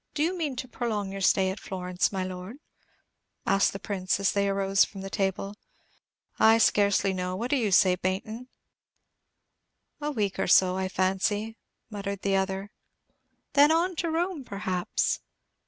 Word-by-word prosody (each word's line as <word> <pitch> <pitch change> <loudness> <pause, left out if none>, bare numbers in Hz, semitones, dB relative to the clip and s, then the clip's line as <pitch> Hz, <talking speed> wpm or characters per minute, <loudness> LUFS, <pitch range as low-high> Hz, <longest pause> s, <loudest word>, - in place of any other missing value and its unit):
"Do 295 - +1
you 350 +4 0
mean 310 -6 -2
to 255 - -5
prolong 215 -5 -3
your 195 0 -6
stay 190 0 +3
at 190 - -7
Florence, 180 -1 -2
my 190 -2 -2
Lord?" 185 +6 -7 0.9
asked 195 0 +3
the - - -6
Prince, 195 -2 -2
as 195 - +2
they 200 0 +1
arose 195 0 +3
from 195 - -6
the 195 0 -7
table. 195 0 -2 0.8
"I 225 +1 +6
scarcely 200 -3 +3
know. 180 0 -3
What 235 +6 -3
do - - +4
you 225 -7 0
say, 185 0 +5
Baynton?" 195 +7 -3 1.5
"A 295 - -1
week 210 -9 -2
or - - 0
so, 185 0 +5
I 190 0 -1
fancy," 200 +4 0 0.4
muttered 200 -1 -5
the 195 -1 +1
other. 190 0 0
"And - - -49 0.3
then 290 +2 +6
on 345 +3 +1
to 335 - -1
Rome, 335 -1 -1
perhaps?" 190 -5 -1
200 Hz, 165 wpm, -27 LUFS, 190-230 Hz, 1.5 s, I